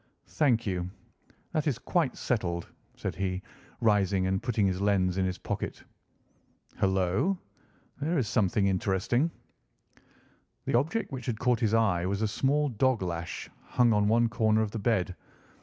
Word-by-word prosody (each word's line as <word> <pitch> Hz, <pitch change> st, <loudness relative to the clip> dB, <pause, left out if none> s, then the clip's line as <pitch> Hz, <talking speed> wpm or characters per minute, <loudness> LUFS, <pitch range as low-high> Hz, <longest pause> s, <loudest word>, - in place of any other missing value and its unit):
"Thank 125 Hz, -7 st, +2 dB
you. 90 Hz, -3 st, -2 dB, 0.6 s
That 155 Hz, -1 st, 0 dB
is 135 Hz, -6 st, +1 dB
quite 140 Hz, +3 st, 0 dB
settled," 85 Hz, -8 st, -1 dB, 0.3 s
said -, -, -3 dB
he, 95 Hz, -1 st, -2 dB, 0.4 s
rising 100 Hz, -4 st, +3 dB
and 95 Hz, 0 st, 0 dB
putting 115 Hz, -4 st, +1 dB
his 95 Hz, 0 st, 0 dB
lens 95 Hz, -3 st, +2 dB
in 95 Hz, -, +2 dB
his 90 Hz, -1 st, -2 dB
pocket. -, -, -4 dB, 1.0 s
"Hullo! 95 Hz, -, +2 dB, 0.6 s
Here 160 Hz, +4 st, 0 dB
is 125 Hz, -6 st, +1 dB
something 100 Hz, -2 st, +2 dB
interesting!" 100 Hz, -, +1 dB, 1.4 s
The -, -, -1 dB
object 155 Hz, -, +1 dB
which 130 Hz, -3 st, -6 dB
had 115 Hz, -3 st, -1 dB
caught 125 Hz, -2 st, +2 dB
his 115 Hz, -2 st, +2 dB
eye 95 Hz, -6 st, +2 dB
was 100 Hz, +3 st, -1 dB
a -, -, +2 dB
small 140 Hz, +7 st, +1 dB
dog 125 Hz, -2 st, +1 dB
lash 85 Hz, -1 st, -4 dB
hung 120 Hz, -2 st, +2 dB
on 105 Hz, 0 st, +3 dB
one 115 Hz, +2 st, +4 dB
corner 110 Hz, -2 st, +2 dB
of 105 Hz, -, -3 dB
the 115 Hz, -, -4 dB
bed. 100 Hz, -5 st, +1 dB
105 Hz, 155 wpm, -29 LUFS, 95-125 Hz, 1.4 s, one